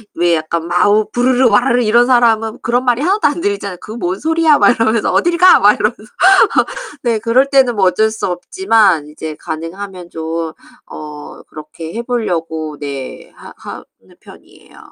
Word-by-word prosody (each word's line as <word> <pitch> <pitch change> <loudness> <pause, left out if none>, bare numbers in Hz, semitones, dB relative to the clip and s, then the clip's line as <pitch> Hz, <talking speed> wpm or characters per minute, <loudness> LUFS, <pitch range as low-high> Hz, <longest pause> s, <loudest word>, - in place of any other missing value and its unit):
왜 170 0 +2
약간 165 +1 -3
마우 205 +4 +2
부르르 250 +1 +2
와르르 245 +4 +2
이런 235 +3 +3
사람은 225 -3 +1
그런 245 +2 0
말이 245 +1 0
하나도 385 +4 +1
안 295 +4 -3
들리잖아요. 200 - -3
"그 - - -10
뭔 190 -4 -4
소리야?" 320 -1 +2
막 - - +4
이러면서 225 -1 0
"어딜 345 0 +1
가?" 365 0 +6
막 205 +1 +5
이러면서. 215 +1 -2 1.0
네. 230 -3 0
그럴 250 +5 +1
때는 260 -4 +3
뭐 195 -2 +1
어쩔 220 +4 +2
수 220 - -4
없지만 195 - +1
이제 155 0 -8
가능하면 175 +3 -7
좀 160 0 -5 0.4
어 150 -1 -10
그렇게 155 +2 -10
해 235 - -4
보려고 165 - -4
네. 140 -2 -7
하 - - -13 0.5
하는 - - -23
편이에요. - - -18
215 Hz, 330 characters per minute, -15 LUFS, 165-245 Hz, 1.0 s, 가